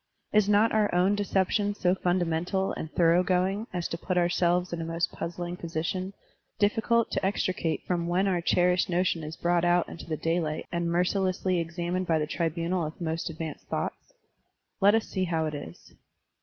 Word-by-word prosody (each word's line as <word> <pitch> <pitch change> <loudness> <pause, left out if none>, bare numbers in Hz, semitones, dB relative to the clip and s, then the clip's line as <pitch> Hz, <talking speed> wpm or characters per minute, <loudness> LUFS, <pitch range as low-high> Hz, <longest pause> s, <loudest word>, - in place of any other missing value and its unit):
Is 210 -1 +4
not 210 +2 +4
our 215 -1 +2
own 185 +3 +4
deception 205 0 +1
so 180 -3 +2
fundamental 180 +1 0
and 160 - -6
thorough 170 0 +4
going 190 +4 0
as 175 -2 -2
to 165 - -4
put 185 +1 -2
ourselves 175 0 +2
in 170 - -3
a - - -2
most 165 +1 -1
puzzling 175 +1 -5
position, 175 +3 -3 0.4
difficult 225 +2 +2
to - - -1
extricate 185 -3 -1
from 170 -2 -1
when 180 +3 +2
otir 180 -3 0
cherished 180 +1 +2
notion 175 -2 +1
is 155 +2 -7
brought 175 0 +1
out 175 0 +3
into 165 - -9
the 155 -2 -2
daylight 165 -1 -1
and 170 -1 -1
mercilessly 185 +1 +1
examined 175 +2 -2
by 165 - +3
the 150 - 0
tribunal 170 +2 -1
of 155 0 -6
most 165 -1 -2
advanced 160 -1 -6
thoughts? - - -4 0.7
Let 205 +2 +6
us 225 - +1
see 190 -2 -1
how 165 -2 0
it 155 - -3
is. 85 - -9
175 Hz, 180 wpm, -28 LUFS, 165-190 Hz, 0.7 s, Let